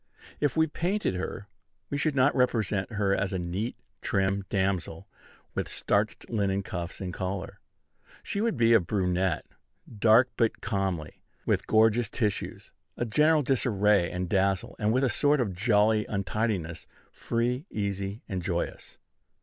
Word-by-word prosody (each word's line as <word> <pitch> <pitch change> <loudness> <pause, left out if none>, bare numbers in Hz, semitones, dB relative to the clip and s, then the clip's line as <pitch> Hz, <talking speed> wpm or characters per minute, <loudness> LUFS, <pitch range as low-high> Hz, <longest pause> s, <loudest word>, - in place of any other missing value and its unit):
If 145 -2 0
we 160 - +5
painted 180 - -1
her, 95 +2 -5 0.4
we 145 - 0
should 150 -1 0
not 135 +2 +4
represent 110 -5 +1
her 100 -2 +1
as 100 -1 -1
a - - 0
neat, 90 +6 -3 0.3
trim 95 0 0
damsel, 95 -2 -1 0.5
with - - -2
starched 105 +1 -1
linen 100 -3 0
cuffs 85 -2 -5
and 90 -2 -4
collar: 95 +1 -4 0.6
she 200 - -2
would 225 - 0
be 115 0 +5
a 115 - +7
brunette, 90 -2 0 0.5
dark 115 +4 +5
but 115 -2 +1
comely, 95 -7 -3 0.2
with - - 0
gorgeous 110 +1 +4
tissues, 105 -5 -3 0.3
a 120 - -1
general 150 +6 +3
disarray 105 -8 +2
and 90 0 -3
dazzle, 95 0 0
and 105 0 +2
with 130 +3 +2
a - - +4
sort 145 +5 +2
of 110 -7 0
jolly 105 +2 +2
untidiness, 100 -4 -2 0.2
free, 125 +7 -2
easy, 100 0 -3
and 95 -4 -3
joyous. - - -4
105 Hz, 145 wpm, -28 LUFS, 95-120 Hz, 0.6 s, a